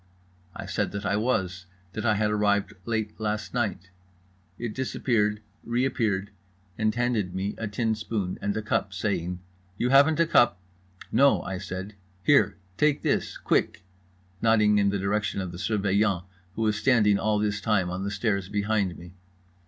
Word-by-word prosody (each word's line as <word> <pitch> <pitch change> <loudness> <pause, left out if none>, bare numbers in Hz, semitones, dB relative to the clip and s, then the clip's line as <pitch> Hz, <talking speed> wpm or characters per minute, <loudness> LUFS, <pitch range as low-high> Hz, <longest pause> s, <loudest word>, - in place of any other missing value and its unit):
I - - -6
said - - -2
that 100 0 -4
I 100 - +1
was, 95 -5 -1 0.3
that 110 +1 -2
I 110 - +4
had 105 0 +1
arrived 105 -1 +1
late 110 -2 -2
last 105 0 -3
night. 105 -6 -2 0.7
It 115 -2 -4
disappeared, 110 -4 0 0.2
reappeared, 115 -5 0 0.4
and 110 +1 0
handed 115 -7 0
me 95 +2 -2
a 115 - -2
tin 110 +2 0
spoon 105 -3 -3
and 100 0 -1
cup, 95 -2 -1
saying: 90 -3 -2 0.4
"You 125 - 0
haven't 145 +3 +5
a 170 - +5
cup?"—"No" 95 - +1
I 95 -1 -4
said. 95 +4 -6 0.3
"Here. 145 -2 +4 0.2
Take 150 -1 +2
this. - - 0
Quick." - - 0 0.6
Nodding 105 -2 +4
in 100 0 +3
the 100 - 0
direction 100 +1 -1
of 95 -2 -4
the 85 - -8
Surveillant, 100 -2 +1 0.3
who 110 - -1
was 105 -1 +1
standing 110 -5 +3
all 110 +1 +1
this 105 0 -1
time 100 -4 +1
on 90 +2 -3
the 100 - -2
stairs 100 -3 -1
behind 100 -3 0
me. 85 +1 -12
105 Hz, 160 wpm, -26 LUFS, 95-110 Hz, 0.7 s, haven't